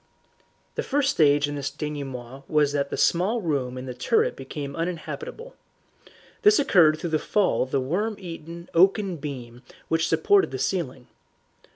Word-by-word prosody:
The - - -2
first 280 0 +1
stage 145 - +4
in 145 - -4
this 140 -2 -3
denouement 135 -3 -6
was 150 -2 +3
that 140 -1 -1
the - - -4
small 190 +8 +2
room 140 - -2
in 130 - -6
the 125 - -5
turret 450 - +1
became 140 -3 -6
uninhabitable. 440 - -5 0.9
This 420 -1 +6
occurred 165 - +5
through 165 +1 -4
the 155 - +2
fall 205 +3 +1
of 130 - -1
the 135 - +1
worm 190 +12 -1
eaten 170 -2 -9
oaken 190 +1 +3
beam 125 -5 -7 0.3
which 165 0 +1
supported 405 -1 +3
the - - -5
ceiling. 135 -9 -2
155 Hz, 160 wpm, -25 LUFS, 140-195 Hz, 0.9 s, This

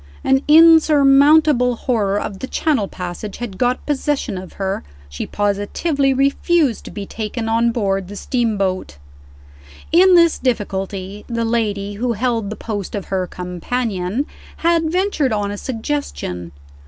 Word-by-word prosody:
An 265 0 +3
insurmountable 300 -4 +6
horror 210 -5 0
of 200 -2 -5
the 260 - -5
Channel 270 -11 0
passage 180 +3 -6
had 225 -6 -7
got 250 0 0
possession 285 -6 -1
of 185 0 -8
her; 195 -1 -3 0.3
she 70 - -5
positively 210 +8 0
refused 275 0 +1
to - - -7
be 205 -2 -6
taken 225 +2 -4
on 230 +1 +2
board 195 -5 -1
the 205 - -9
steamboat. 200 - -1 0.9
In 365 +3 +6
this 335 -2 +4
difficulty, 200 -4 -3
the 230 -1 -2
lady 205 -3 -1
who 245 -1 +1
held 230 -2 -1
the 215 - -5
post 205 -4 -5
of 200 - -6
her 185 -1 0
"companion" 185 - -3 0.4
had 330 -2 +2
ventured 360 - 0
on 205 -2 -1
a - - -4
suggestion. 225 - -4
230 Hz, 140 wpm, -19 LUFS, 200-275 Hz, 0.9 s, insurmountable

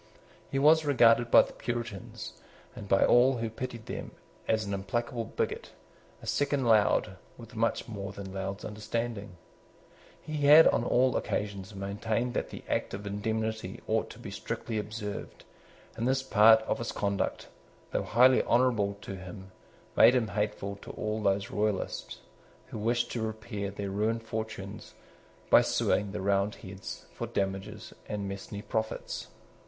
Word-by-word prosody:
He 135 - -2
was 155 +3 +6
regarded 120 -4 +5
by - - +8
the - - -10
Puritans, 120 -5 -5 0.4
and 100 - -9
by 95 - +5
all 125 +2 +5
who 115 -1 -3
pitied 120 -1 -6
them, - - -5 0.4
as 110 -1 +1
an 100 - -3
implacable 115 +5 -2
bigot, 115 - -3 0.5
a - - -8
second 140 -2 0
Laud, 105 -4 +3 0.2
with 115 0 -12
much 115 +1 0
more 100 -4 -5
than 100 -1 -8
Laud's 95 +1 -4
understanding. 110 -2 -4 0.8
He 155 -1 -5
had 155 +3 +10
on - - +2
all 125 +1 +3
occasions 100 -1 -3
maintained 105 +5 -2
that - - -2
the - - -9
Act - - -1
of 100 +1 -8
indemnity 110 +2 -3
ought - - 0
to - - -11
be - - -8
strictly 110 -2 -4
observed; 105 -1 -6 0.5
and 115 - -1
this 130 0 +1
part 110 -2 +6
of - - -2
his 115 - -3
conduct, 100 -1 -2 0.4
though - - 0
highly 125 +3 +5
honourable 115 -5 +2
to 95 - -6
him, 95 +1 -10 0.4
made 125 - +7
him 115 -4 +1
hateful 100 -1 -2
to - - -12
all 110 0 -2
those 100 -1 +1
Royalists 105 -2 -2 0.5
who - - -6
wished 120 +3 0
to 120 - -2
repair 110 -2 -4
their 100 0 -5
ruined 110 +3 0
fortunes 110 0 -6 0.6
by - - +9
suing 105 -2 +1
the 105 0 -4
Roundheads 100 -1 -2
for - - -4
damages 95 -1 -3 0.2
and 100 -1 -3
mesne 100 +1 -6
profits. 110 0 -3
110 Hz, 150 wpm, -30 LUFS, 100-115 Hz, 0.8 s, had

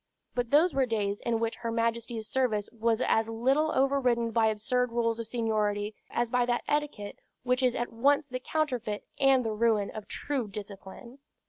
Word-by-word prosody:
But 245 -1 -1
those 310 +5 +4
were 270 -1 +2
days 205 -3 -1
in 230 -1 +1
which 230 0 -2
her 230 - -4
Majesty's 230 -1 -1
service 235 -6 0
was 230 0 0
as 225 0 +2
little 265 +7 +2
overridden 255 -4 +2
by 225 0 +3
absurd 245 +3 0
rules 230 -1 0
of 230 - -4
seniority 215 -3 -1 0.2
as 240 -1 -1
by 245 0 +3
that 240 0 0
etiquette 290 -9 -2 0.2
which 250 +1 +1
is 250 -2 +2
at 240 -1 -3
once 280 +5 +2
the 255 -2 -4
counterfeit 250 -8 -2
and 270 -2 +4
the 220 - -1
ruin 215 -2 +1
of 215 -2 -8
true 275 -6 -3
discipline. 205 +5 -10
235 Hz, 180 wpm, -29 LUFS, 220-255 Hz, 0.2 s, those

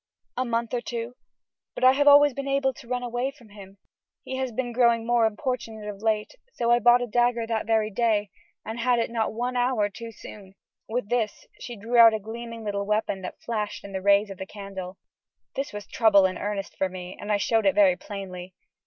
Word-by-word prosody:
"A 255 - 0
month 235 -1 -2
or 245 - 0
two; 235 0 -5 0.6
but - - -5
I 255 - +8
have 285 +2 +1
always 290 0 +7
been 275 +2 -5
able 275 -1 +1
to 235 - -14
run 250 0 -2
away 245 +2 -2
from 255 -6 -17
him. 200 -1 -13 0.5
He 260 - -5
has 260 -1 -2
been 245 +1 -3
growing 235 -2 +3
more 235 -1 +3
importunate 220 -2 -4
of 205 -1 -7
late, 220 - 0 0.2
so 235 -1 0
I 240 - +5
bought 240 +1 +5
a - - -1
dagger 240 0 +1
that 225 -1 -2
very 220 -1 +1
day, 210 -2 +1 0.3
and 225 +2 -5
had 245 +1 +2
it 230 0 -1
not 225 -2 -1
one 245 +3 -3
hour 245 -4 +1
too 230 +3 -9
soon." 195 -3 -12 0.3
With 225 -2 -2
this 230 -4 -1
she 240 - -7
drew 230 +3 -2
out 225 -1 +8
a - - -2
gleaming 230 +2 -8
little 200 -1 -3
weapon 210 -2 0
that 180 - -8
flashed 215 -3 -3
in 200 - -9
the 190 -1 -4
rays 200 +1 +3
of 195 - -9
the 190 - -6
candle. 195 -2 -8 0.6
This 275 +2 -3
was 205 0 -7
trouble 210 -5 +4
in 185 -1 0
earnest 200 -1 -4
for 190 - 0
me, 180 0 -8
and 210 - -4
I 205 - +3
showed 220 +1 +1
it 195 - +3
very 195 -3 +5
plainly. 185 -2 -8
225 Hz, 220 wpm, -26 LUFS, 205-240 Hz, 0.6 s, I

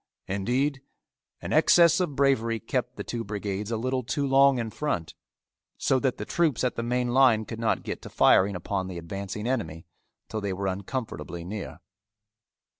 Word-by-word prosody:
Indeed 125 +9 -1 0.6
an - - -4
excess 170 -1 +6
of 175 -6 -1
bravery 115 -5 +2
kept 125 +2 -2
the - - -5
two 120 -1 -4
brigades 105 0 -4
a 115 - -1
little 130 +3 -1
too 140 +4 -2
long 135 0 +5
in 115 -2 -3
front, 120 - -3 0.6
so 130 - +2
that 130 -1 0
the - - -5
troops 160 -9 +1
at 125 - +1
the - - -2
main 125 +1 0
line 120 -4 +4
could 115 0 -7
not 115 -1 0
get - - -5
to - - -9
firing 100 +1 +4
upon 95 +1 -3
the 90 -2 -6
advancing 100 +5 -5
enemy 105 -11 -2 0.4
till 110 - -4
they 100 -2 -2
were 100 +1 -4
uncomfortably 95 - -4
near. 95 -3 -6
115 Hz, 175 wpm, -27 LUFS, 100-130 Hz, 0.6 s, excess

